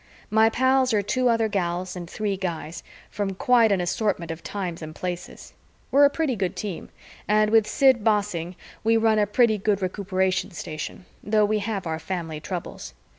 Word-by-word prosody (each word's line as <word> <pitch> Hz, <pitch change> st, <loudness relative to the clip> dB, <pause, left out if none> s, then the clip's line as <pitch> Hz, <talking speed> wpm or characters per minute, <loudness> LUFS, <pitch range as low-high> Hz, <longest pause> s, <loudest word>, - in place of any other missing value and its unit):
My 220 Hz, +1 st, +5 dB
pals 260 Hz, +1 st, +2 dB
are 205 Hz, -, +1 dB
two 255 Hz, +4 st, +1 dB
other 230 Hz, -1 st, +2 dB
gals 180 Hz, -2 st, -2 dB
and 175 Hz, -2 st, -7 dB
three 205 Hz, -1 st, -2 dB
guys 170 Hz, -3 st, -5 dB, 0.3 s
from 200 Hz, -2 st, -3 dB
quite 230 Hz, +1 st, +4 dB
an 195 Hz, -, +2 dB
assortment 175 Hz, -1 st, -1 dB
of 165 Hz, +1 st, -7 dB
times 180 Hz, -4 st, -5 dB
and 155 Hz, 0 st, -8 dB
places. 180 Hz, -1 st, -6 dB, 0.4 s
We're 285 Hz, +1 st, +6 dB
a -, -, +6 dB
pretty 290 Hz, -4 st, -1 dB
good 190 Hz, -4 st, -2 dB
team, 200 Hz, -6 st, -5 dB, 0.4 s
and 215 Hz, 0 st, +3 dB
with 220 Hz, -1 st, +4 dB
Sid 260 Hz, -4 st, +3 dB
bossing, 200 Hz, -5 st, 0 dB, 0.3 s
we 225 Hz, +1 st, +4 dB
run 220 Hz, -1 st, +3 dB
a 205 Hz, -, +2 dB
pretty 220 Hz, 0 st, +3 dB
good 200 Hz, 0 st, +1 dB
Recuperation 190 Hz, 0 st, -1 dB
Station, 165 Hz, 0 st, -7 dB, 0.2 s
though 210 Hz, 0 st, +3 dB
we 215 Hz, +1 st, 0 dB
have 200 Hz, -2 st, -3 dB
our 160 Hz, -1 st, -3 dB
family 165 Hz, -3 st, -4 dB
troubles. 170 Hz, -, -6 dB
200 Hz, 175 wpm, -24 LUFS, 180-220 Hz, 0.4 s, We're